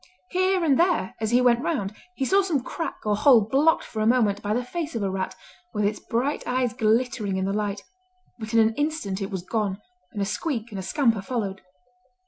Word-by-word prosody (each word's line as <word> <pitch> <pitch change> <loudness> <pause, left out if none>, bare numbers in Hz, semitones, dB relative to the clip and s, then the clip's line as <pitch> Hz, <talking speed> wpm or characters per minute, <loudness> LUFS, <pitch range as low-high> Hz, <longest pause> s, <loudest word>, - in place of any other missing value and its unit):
Here 370 0 +2
and 285 -5 +3
there 345 - +2
as 220 - 0
he 245 +2 +4
went 240 -1 +4
round 245 - -2 0.2
he 270 - -1
saw 390 +7 +4
some 325 -10 -1
crack 330 +5 -4
or 210 -1 +2
hole 240 +1 +6
blocked 275 +10 +3
for 215 - -5
a 215 - +2
moment 220 -4 +3
by 205 - -3
the 245 +3 +1
face 325 +1 -4
of 225 - -1
a 195 - 0
rat 190 0 -3 0.4
with 210 0 +1
its 205 +1 0
bright 255 +6 -1
eyes 250 -2 0
glittering 225 -4 +1
in 190 - 0
the 195 - -1
light, 205 -1 -2 0.6
but 220 -1 -6
in 230 - +4
an 220 0 +4
instant 290 -9 -2
it 195 - -3
was 190 -3 -4
gone, 205 -1 -2 0.3
and 205 - -6
a 200 - +1
squeak 235 - -3
and 200 - -5
a - - -3
scamper 230 0 +1
followed. 195 -3 -3
225 Hz, 220 wpm, -25 LUFS, 205-275 Hz, 0.6 s, hole